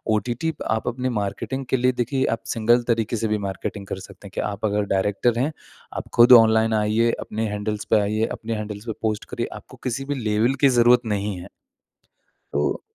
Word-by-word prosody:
OTT 120 +9 -2 0.2
आप 110 0 -1
अपने 125 +1 -1
marketing 120 +5 -3
के 130 - +2
लिए 125 +1 +3
देखिए 130 +2 -1
आप 115 0 -2
सिंगल 120 +2 +3
तरीके 115 -1 0
से 110 - -1
भी 105 0 0
मार्केटिंग 100 +1 -5
कर 95 - -4
सकते 100 +1 -12
हैं - - -14
कि - - 0
आप 100 +2 -4
अगर 105 0 +1
डायरेक्टर 105 +5 +1
हैं 140 +5 +1 0.5
आप - - -5
ख़ुद 120 +1 +7
ऑनलाइन 110 0 +3
आइए 110 +2 +2
अपने 110 +1 -3
हैंडल्स 105 0 -3
पे 110 - +5
आइए 105 +2 0
अपने 115 0 -4
हैंडल्स 105 0 -6
पे 115 - -3
पोस्ट 110 -2 -1
करिए - - -3
आपको - - -12
किसी 130 +2 -2
भी 145 +1 -2
लेवल 110 +4 +2
की 140 - +6
ज़रूरत 120 +1 +6
नहीं 105 -2 -2
है। - - -10 1.1
तो 75 +1 0
110 Hz, 200 wpm, -23 LUFS, 105-120 Hz, 1.1 s, ख़ुद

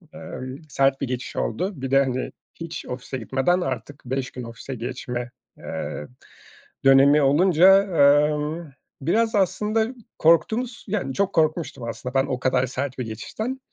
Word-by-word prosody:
ııı, 135 -8 -7
sert 135 -1 +2
bir 140 - -1
geçiş 125 0 -5
oldu. 180 - -1
Bir 135 - -4
de 135 0 +5
hani, 130 -1 -3 0.2
hiç 165 -1 -7
ofise 125 +1 -5
gitmeden 135 +9 +1
artık 130 -2 -5
5 130 +1 -3
gün 125 - -7
ofise 115 +3 -7
geçme, 125 0 -5 0.3
eee, 75 - -5 0.8
dönemi 135 +2 +7
olunca, 180 +6 +6
eee, 150 -4 +4 0.7
biraz 220 +10 +1
aslında 210 +3 +1 0.3
korktuğumuz, 220 +10 +2
yani 185 -10 -2
çok 195 +3 0
korkmuştum 155 -4 0
aslında 125 +3 -6
ben 135 0 +3
o 130 -2 -3
kadar 130 0 +1
sert 130 +1 -4
bir 125 - -2
geçişten 220 - -5
140 Hz, 145 wpm, -24 LUFS, 130-180 Hz, 0.8 s, dönemi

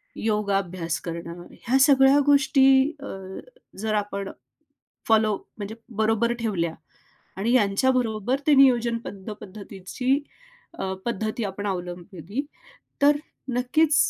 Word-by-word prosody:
योगाभ्यास 195 -6 -1
करणं, 170 0 -6
ह्या 260 +3 0
सगळ्या 270 0 +6
गोष्टी 285 -1 +4 0.3
अ, 280 - -8 0.7
जर 215 +1 -1
आपण 200 -1 -2 0.8
फॉलो 215 -2 +4 0.2
म्हणजे 210 +1 -6 0.3
बरोबर 225 +2 +2
ठेवल्या 175 -8 -1 0.6
आणि 220 +5 0
यांच्याबरोबर 240 +2 +2
ते 300 - +6
नियोजनबद्ध 235 -6 +2
पद्धतीची 200 +5 -3 0.7
अ, 190 0 -2
पद्धती 220 0 -2
आपण 200 +1 -5
अवलंबली 180 - -5 0.6
तर 290 +1 +6 0.4
नक्कीच 290 +5 +2
215 Hz, 100 wpm, -25 LUFS, 195-255 Hz, 0.8 s, सगळ्या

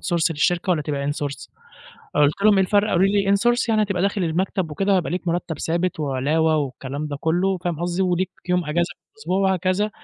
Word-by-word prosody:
source 165 0 +2
للشركة، 175 +5 0
والّا 165 -4 +2
تبقى 145 -1 -2
in - - -5
source؟" 140 -3 -5 0.7
قُلت 150 +6 +2
لهم: 215 -1 +6
"إيه 195 - +4
الفرق؟" 205 +3 +2
قالوا 175 +2 +3
لي: 200 0 +2
"in - - +5
source 240 +3 +1
يعني 215 -1 +3
هتبقى 190 -3 -1
داخل 200 -1 0
المكتب 170 0 -1
وكده، 195 +5 +1
هيبقى 175 - -1
ليك 180 0 -3
مرتب 170 -1 -2
ثابت، 170 0 -1
وعلاوة، 150 +3 +1
والكلام 140 +1 -4
ده 145 -1 -5
كله." 180 +3 +1
فاهم 170 -2 -3
قصدي؟ 175 +2 -1
"وليك 185 0 0 0.2
يوم 180 -1 +1
أجازة 170 +3 -1
في - - -69
الأسبوع، 190 -3 -2
وهكذا. 190 +2 +1
175 Hz, 210 wpm, -22 LUFS, 155-195 Hz, 0.7 s, لهم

